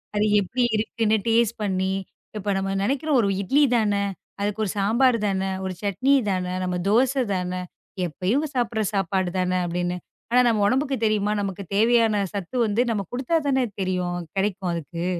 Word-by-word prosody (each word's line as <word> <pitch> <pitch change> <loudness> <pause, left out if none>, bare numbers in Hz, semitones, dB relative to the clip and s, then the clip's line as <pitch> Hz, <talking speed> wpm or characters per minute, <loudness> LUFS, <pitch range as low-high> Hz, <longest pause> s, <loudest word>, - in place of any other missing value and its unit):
அது 210 +1 +2
எப்படி 235 +6 -1
இருக்குன்னு 220 0 +1
டேஸ்ட் 230 0 +2
பண்ணி, 190 -1 0 0.4
இப்ப 205 0 -2
நம்ம 195 0 -1
நெனைக்கிறோம் 275 +4 +1
ஒரு 205 - +1
இட்லி 270 +10 +3
தான. 215 -2 +2 0.5
அதுக்கு 205 +1 -1
ஒரு 190 - -2
சாம்பார் 230 +5 +3
தான, 190 -1 0 0.2
ஒரு 190 - -3
சட்னி 205 +7 +1 0.2
தான, 185 -2 0 0.2
நம்ம 180 -1 -1
தோசை 255 +4 +3
தான, 180 -1 -2 0.5
எப்பயும் 185 - 0
சாப்பிடுற 235 -3 0
சாப்பாடு 190 -1 0
தான 185 0 +1
அப்படின்னு. 175 +1 -2 0.3
ஆனா 245 +2 +4
நம்ம 220 -3 +2
உடம்புக்கு 270 +4 +1
தெரியுமா? 210 -1 +1
நமக்குத் 195 -1 -5
தேவையான 225 -1 +3
சத்து 200 +3 -5
வந்து 215 +2 +1
நம்ம 210 -3 0
குடுத்தாத்தானே 270 +1 +1 0.2
தெரியும் 180 -1 -1 0.2
கெடைக்கும் 195 -2 -1
அதுக்கு. 170 +1 -4
205 Hz, 155 wpm, -24 LUFS, 185-235 Hz, 0.5 s, ஆனா